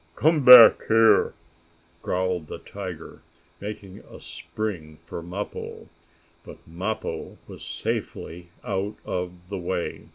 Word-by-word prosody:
"Come 155 -1 +2
back 125 -3 +9
here!" 115 0 +4 0.7
growled 90 -3 -2
the - - -7
tiger, 95 -5 -9 0.4
making 100 -2 -8
a - - -14
spring 85 -8 -6
for 85 - -7
Mappo. 90 +5 -7 0.5
But - - -12
Mappo 95 +7 -5
was - - -11
safely 85 +1 -5 0.2
out 100 +2 -3
of 90 0 -5
the 100 -2 -4
way. 90 0 -4
95 Hz, 110 wpm, -24 LUFS, 90-105 Hz, 0.7 s, back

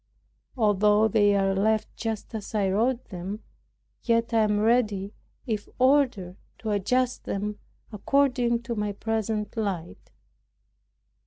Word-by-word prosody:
Although 210 0 +3
they 205 0 +3
are 195 -1 +2
left 215 +2 0
just 225 0 -4
as 220 0 -6
I 195 -2 +1
wrote 235 +5 0
them, 190 +2 -6 0.6
yet 230 0 +1
I 225 - +4
am 210 -1 +2
ready, 215 -3 +1 0.3
if 215 -5 -3
ordered, 255 -9 +2 0.2
to 220 - -4
adjust 250 +5 0
them 210 +1 -3 0.3
according 245 0 +1
to 235 0 -3
my 210 -2 -2
present 220 0 -2
light. 190 - -4
215 Hz, 125 wpm, -26 LUFS, 205-235 Hz, 0.6 s, I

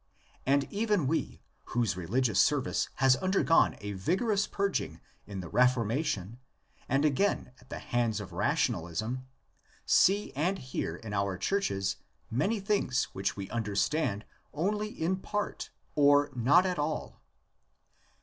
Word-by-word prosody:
And 140 +1 +4
even 210 -6 +1
we, 160 +5 -2 0.3
whose 115 -7 +2
religious 105 +5 0
service 145 -3 +2
has 130 -1 +4
undergone 185 -3 +3
a 100 0 -4
vigorous 200 - 0
purging 200 -1 -2 0.3
in 100 -2 -5
the 90 - -7
Reformation 120 - +1 0.5
and 135 +3 +2
again 155 0 +1
at 125 - -21
the - - -5
hands 115 -3 -1
of 95 -3 -8
rationalism, 115 - -1 0.6
see 200 +2 +3
and 175 +7 0
hear 130 - -4
in 105 +3 -8
our 100 -2 0
churches 100 - -1 0.3
many 195 - +1
things 195 -11 +1
which 95 +1 -2
we 100 -1 -5
understand 110 +1 0 0.3
only 210 +7 0
in 185 -1 -1
part 205 +2 -4 0.2
or 145 0 +4
not 135 +9 +4
at 180 -3 -1
all. 150 +1 -3
130 Hz, 130 wpm, -30 LUFS, -, 0.6 s, And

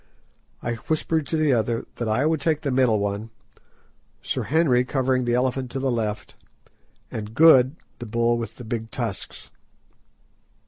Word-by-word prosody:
I 120 - -1
whispered 155 +5 -1
to 160 - -1
the 155 -3 +3
others 115 0 0
that 120 - -2
I 110 +6 +1
would 160 -1 +1
take 155 0 +1
the 140 - -2
middle 125 -4 +3
one; 100 +2 -3 0.9
Sir - - -2
Henry 140 -5 +3
covering 130 -1 0
the 120 0 +1
elephant 130 0 0
to 135 - -2
the 135 -1 0
left, 110 -3 -3 0.8
and 110 0 -6
Good 140 -3 +6 0.2
the 120 - -6
bull 115 +1 +1
with 115 -3 -6
the 125 - -10
big 115 0 -4
tusks. - - -6
125 Hz, 155 wpm, -24 LUFS, 115-135 Hz, 0.9 s, Good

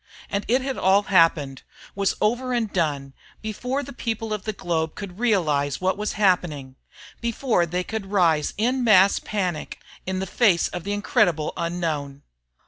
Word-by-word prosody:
And 200 +1 -1
it 255 +3 +2
had 270 -1 -3
all 195 +2 +4
happened, 165 -8 +2 0.3
was 200 -1 0
over 245 +4 +1
and 230 -4 -1
done, 145 -6 -1 0.3
before 250 +6 -3
the 280 - -9
people 225 -2 -3
of 210 -3 -5
the 215 - -1
globe 165 -5 -2
could 200 -2 -8
realize 155 - +1
what 185 0 +1
was 210 +1 -3
happening, 175 -10 0 0.4
before 235 -6 0
they 180 +2 -2
could 215 0 -5
rise 170 -6 +2
in 250 +4 +1
mass 200 -4 +5
panic 180 -7 -3 0.3
in 190 0 -1
the 190 - -2
face 190 -2 +3
of 180 0 -6
the 205 - -1
incredible 205 - +1
unknown. 160 -5 -3
190 Hz, 160 wpm, -24 LUFS, 165-220 Hz, 0.4 s, mass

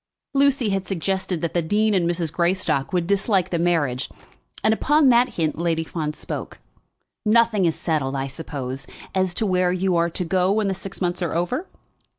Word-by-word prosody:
Lucy 275 -4 +3
had 195 -1 -1
suggested 190 -1 -2
that 170 - -1
the 175 - +2
dean 210 +6 +2
and 175 -3 +2
Mrs. 170 -3 -2
Greystock 170 -6 0
would 180 -2 +1
dislike 195 0 +1
the 170 - 0
marriage, 150 -7 0 0.5
and 220 - +4
upon 295 +4 +3
that 245 +1 +3
hint 160 -2 -1
Lady 165 -1 0
Fawn 155 -2 -3
spoke. - - -6 0.7
"Nothing 220 -3 +3
is 165 - +1
settled, 145 -5 -1
I 135 0 -1
suppose, 135 -2 -6 0.3
as 185 -2 0
to 220 - +1
where 180 -2 +2
you 185 0 +1
are 170 0 +2
to 175 +2 -4
go 185 +2 +2
when 210 -1 +1
the - - 0
six 195 +1 -7
months 180 0 -1
are 175 - -1
over?" 245 - -1
180 Hz, 185 wpm, -23 LUFS, 165-200 Hz, 0.7 s, and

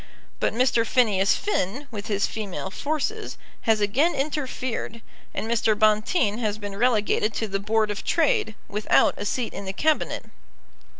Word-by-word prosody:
But - - +1
Mr. 240 -1 +2
Phineas 210 -5 +3
Finn, 280 - -2
with 210 -1 -6
his 205 -2 +1
female 200 -3 -5
forces, 315 - -3 0.3
has 220 -1 +4
again 260 +12 +2
interfered, 260 -5 -3 0.3
and - - -4
Mr. 225 -2 +2
Bonteen 215 - +2
has 215 -3 -1
been 205 -2 -6
relegated 215 -1 +2
to 220 - -1
the 195 -1 -2
Board 215 +1 +1
of 205 - -5
Trade, 300 -9 +1
without 210 +1 +3
a 205 - -3
seat 235 +2 -2
in 200 - -6
the 190 - -4
Cabinet. 310 +8 0
220 Hz, 155 wpm, -25 LUFS, 205-255 Hz, 0.3 s, has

